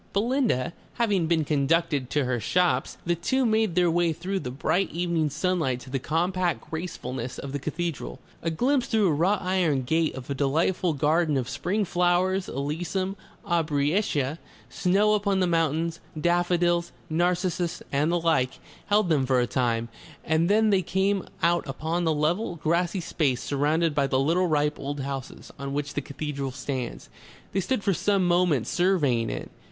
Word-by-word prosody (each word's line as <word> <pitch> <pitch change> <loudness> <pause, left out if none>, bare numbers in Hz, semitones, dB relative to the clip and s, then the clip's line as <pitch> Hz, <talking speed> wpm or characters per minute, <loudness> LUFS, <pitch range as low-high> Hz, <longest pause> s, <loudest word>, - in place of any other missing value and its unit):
Belinda 220 - +1 0.2
having 205 -8 +1
been 160 -2 +2
conducted 145 -2 +1
to 145 -3 +1
her 125 -1 0
shops, 180 +9 +1
the 175 - +2
two 255 +10 0
made 220 -5 +2
their 175 -2 +3
way 170 -1 +2
through 190 +5 -3
the 125 - -5
bright 170 +8 0
evening 170 -2 0
sunlight 155 -4 0
to 130 - -11
the 135 - -1
compact 175 +5 -1
gracefulness 130 -7 -5
of 140 - -6
the 145 - -3
cathedral. 155 - -4 0.2
A 165 - -1
glimpse 250 - +1
through 215 -5 +3
a - - +2
wrought 185 +7 +1
iron 180 -7 +1
gate 160 +3 +1
of 130 -1 -8
a 140 - -2
delightful 160 +6 +1
garden 155 +1 +2
of 125 -2 -2
spring 180 +10 -1
flowers, 180 +2 +1
alyssum, 175 +7 -2 0.3
aubrietia, 155 -1 0 0.3
snow 200 +4 +2
upon 200 -2 +1
the 185 - +3
mountains, 165 -1 0 0.2
daffodils, 175 0 +2 0.2
narcissus 175 +1 0
and 145 +4 +1
the 175 - +2
like, 155 -6 +1 0.3
held 210 -1 +3
them 145 -6 +2
for 130 -1 +3
a 120 - +2
time, 115 -2 0 0.4
and 160 +2 +2
then 215 +1 +4
they 195 -2 +4
came 190 +2 0 0.2
out 170 -1 +2
upon 160 +5 -2
the 160 - +3
level, 165 +6 0
grassy 170 +4 0
space, 135 -7 0
surrounded 150 +3 +1
by 140 -2 +2
little 155 +8 +2
ripe 150 -2 +1
old 140 0 -4
houses, 135 -1 -6
on 140 0 -4
which 145 +1 -3
the 145 - -1
cathedral 140 -1 -4
stands. 130 -1 -5 0.4
They 195 - 0
stood 210 +3 -1
for 195 - +2
some 195 +1 +1
moments 175 -8 +2
surveying 150 - +2
it. - - -5
165 Hz, 165 wpm, -26 LUFS, 140-180 Hz, 0.4 s, then